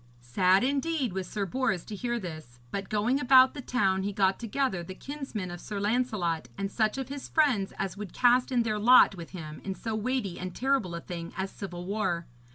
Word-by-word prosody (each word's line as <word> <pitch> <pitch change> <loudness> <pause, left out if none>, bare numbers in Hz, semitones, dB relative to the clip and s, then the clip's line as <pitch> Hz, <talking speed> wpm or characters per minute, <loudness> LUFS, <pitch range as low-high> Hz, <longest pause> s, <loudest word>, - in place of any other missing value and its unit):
Sad 180 - +3
indeed 275 - 0
was 190 -1 -3
Sir 205 0 -2
Bors 195 -4 -1
to 215 - -8
hear 240 +3 -2
this; 155 - -8
but, 195 -1 -4
going 220 +6 +1
about 260 -1 +6
the 285 - -6
town, 195 -7 +1
he 200 +2 -2
got 195 -1 +2
together 235 -4 -1
the 185 +2 -8
kinsmen 265 -9 -6
of 175 - -7
Sir 205 -2 -5
Lancelot 205 - 0
and 195 0 -3
such 215 +3 +1
of 265 -1 -4
his 280 -1 -6
friends 255 -11 +2
as 195 -1 -3
would 205 -4 -6
cast 250 +1 +3
in 245 -2 +3
their 215 -2 -1
lot 245 0 +7
with 170 -3 -9
him 155 -4 -8
in 190 -1 -3
so 225 +2 -4
weighty 215 -4 -2
and 185 0 -5
terrible 260 -10 0
a 170 - -5
thing 170 -1 -7
as 190 0 -2
civil 175 -3 -7
war. 185 -4 -1
205 Hz, 210 wpm, -29 LUFS, 185-250 Hz, -, lot